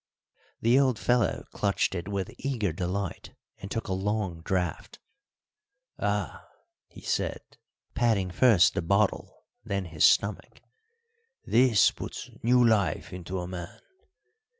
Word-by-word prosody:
The 120 Hz, +4 st, +4 dB
old 130 Hz, -4 st, +2 dB
fellow 120 Hz, -5 st, +1 dB
clutched 100 Hz, -2 st, 0 dB
it 85 Hz, -1 st, -4 dB
with 100 Hz, -2 st, -3 dB
eager 115 Hz, -, -1 dB
delight 90 Hz, +2 st, -4 dB, 0.2 s
and 100 Hz, -, -8 dB
took 115 Hz, -, -4 dB
a 95 Hz, -, -1 dB
long 95 Hz, -3 st, -2 dB
draught. 90 Hz, -3 st, -2 dB, 1.0 s
"Ah!" -, -, -2 dB, 0.4 s
he -, -, -14 dB
said, -, -, -1 dB, 0.5 s
patting 110 Hz, -6 st, +1 dB
first 100 Hz, -4 st, +5 dB
the -, -, -1 dB
bottle, 100 Hz, +4 st, 0 dB, 0.2 s
then 100 Hz, -1 st, -3 dB
his 80 Hz, -3 st, -2 dB
stomach, 105 Hz, +1 st, +2 dB, 0.8 s
"this 115 Hz, -3 st, +4 dB
puts -, -, -8 dB
new 125 Hz, +1 st, +4 dB
life 100 Hz, -10 st, +1 dB
into 90 Hz, +1 st, -5 dB
a 90 Hz, -, -5 dB
man! 90 Hz, -1 st, -8 dB
100 Hz, 125 wpm, -27 LUFS, 90-115 Hz, 1.0 s, first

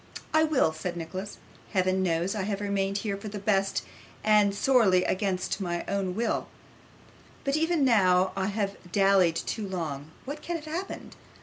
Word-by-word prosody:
'I 315 Hz, 0 st, +5 dB
will,' 275 Hz, -, +2 dB
said 175 Hz, +2 st, -4 dB
Nicholas. 185 Hz, +5 st, -6 dB, 0.4 s
'Heaven 185 Hz, -1 st, +2 dB
knows 175 Hz, +1 st, 0 dB
I 210 Hz, -, -2 dB
have 200 Hz, +1 st, -2 dB
remained 200 Hz, -1 st, 0 dB
here 200 Hz, -1 st, -2 dB
for 200 Hz, -, -8 dB
the 205 Hz, 0 st, -5 dB
best, 195 Hz, -1 st, +1 dB, 0.4 s
and 210 Hz, -2 st, +4 dB
sorely 205 Hz, -6 st, +4 dB
against 190 Hz, 0 st, -1 dB
my 175 Hz, -2 st, -2 dB
own 195 Hz, -2 st, -1 dB
will; 230 Hz, +1 st, -1 dB, 1.0 s
but 275 Hz, 0 st, 0 dB
even 320 Hz, -2 st, +2 dB
now 185 Hz, -6 st, +4 dB
I 195 Hz, -1 st, 0 dB
may 200 Hz, -, -2 dB
have 200 Hz, -4 st, -3 dB
dallied 195 Hz, -4 st, +4 dB
too 210 Hz, +4 st, -3 dB
long. 155 Hz, -6 st, -4 dB, 0.2 s
What 285 Hz, +3 st, -6 dB
can 345 Hz, -, -3 dB
have 320 Hz, -2 st, -6 dB
happened? 340 Hz, +5 st, -5 dB
195 Hz, 170 wpm, -28 LUFS, 185-215 Hz, 1.0 s, I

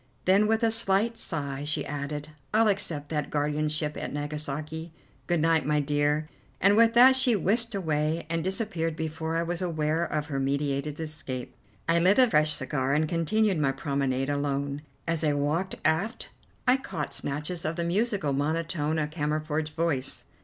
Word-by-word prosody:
Then 195 Hz, +3 st, +5 dB
with 225 Hz, +1 st, +1 dB
a 225 Hz, -, +4 dB
slight 220 Hz, +1 st, +2 dB
sigh 145 Hz, -10 st, -3 dB
she 150 Hz, 0 st, -1 dB
added, 145 Hz, +1 st, -4 dB, 0.3 s
"I'll 225 Hz, 0 st, +5 dB
accept 170 Hz, -8 st, -1 dB
that 150 Hz, -2 st, -2 dB
guardianship 150 Hz, +1 st, -1 dB
at -, -, -4 dB
Nagasaki. 150 Hz, +2 st, -4 dB, 0.4 s
Good 175 Hz, -3 st, +1 dB
night, 165 Hz, -1 st, +3 dB
my 150 Hz, +2 st, +1 dB
dear," 145 Hz, +1 st, +1 dB, 0.3 s
and 200 Hz, +2 st, +5 dB
with 230 Hz, +1 st, +5 dB
that 255 Hz, +2 st, +8 dB
she 255 Hz, -3 st, +3 dB
whisked 225 Hz, +4 st, +1 dB
away 155 Hz, -3 st, 0 dB
and 165 Hz, 0 st, -1 dB
disappeared 185 Hz, -4 st, -1 dB
before 160 Hz, 0 st, -3 dB
I 165 Hz, -, +1 dB
was 170 Hz, +1 st, -3 dB
aware 160 Hz, -2 st, 0 dB
of 150 Hz, -3 st, -2 dB
her 140 Hz, -3 st, -3 dB
meditated 140 Hz, +2 st, -1 dB
escape. 150 Hz, -5 st, -4 dB, 0.3 s
I 165 Hz, +1 st, +4 dB
lit 185 Hz, +4 st, +4 dB
a 255 Hz, -1 st, +7 dB
fresh 155 Hz, -7 st, +3 dB
cigar 130 Hz, 0 st, -1 dB
and 155 Hz, +1 st, +2 dB
continued 180 Hz, +4 st, +1 dB
my 135 Hz, -2 st, +2 dB
promenade 135 Hz, -1 st, -1 dB
alone. 140 Hz, 0 st, -1 dB, 0.2 s
As 165 Hz, -1 st, -1 dB
I 150 Hz, -2 st, +3 dB
walked 150 Hz, +6 st, -1 dB
aft 170 Hz, +9 st, 0 dB, 0.4 s
I 250 Hz, +1 st, +6 dB
caught 160 Hz, -, -5 dB
snatches 150 Hz, +5 st, -4 dB
of 155 Hz, +1 st, -2 dB
the 170 Hz, -, -2 dB
musical 190 Hz, -, 0 dB
monotone 155 Hz, +2 st, -1 dB
of 150 Hz, -1 st, -1 dB
Cammerford's 155 Hz, 0 st, -1 dB
voice. 150 Hz, -4 st, -1 dB
155 Hz, 165 wpm, -27 LUFS, 145-175 Hz, 0.4 s, that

